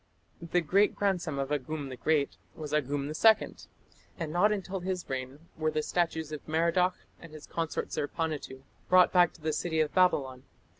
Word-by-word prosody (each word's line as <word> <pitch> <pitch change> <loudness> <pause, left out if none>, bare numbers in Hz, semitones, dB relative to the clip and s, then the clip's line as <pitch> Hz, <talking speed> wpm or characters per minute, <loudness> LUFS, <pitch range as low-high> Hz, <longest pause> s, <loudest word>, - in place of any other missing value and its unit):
The 170 +1 0
great 195 +6 +3
grandson 180 -7 -1
of 135 +1 -2
Agum 145 0 -3
the 130 - -6
Great 150 +1 0 0.2
was 155 -3 -7
Agum 145 -1 0
II, 215 +9 +3 0.6
and 160 -2 -4
not 195 +5 +4
until 195 -2 -3
his 185 0 -4
reign 130 +2 -5
were 155 0 0
the 155 0 -1
statues 160 -3 -1
of 150 - -5
Merodach 170 +3 +2 0.2
and 165 - -12
his 155 -1 -11
consort 165 -1 -3
Zerpanituᵐ 145 -3 -3 0.3
brought 180 0 +6
back 175 -2 +5
to 165 - -19
the 155 0 -1
city 160 +1 -1
of 155 -1 +1
Babylon. 140 -9 +2
160 Hz, 170 wpm, -29 LUFS, 150-180 Hz, 0.6 s, brought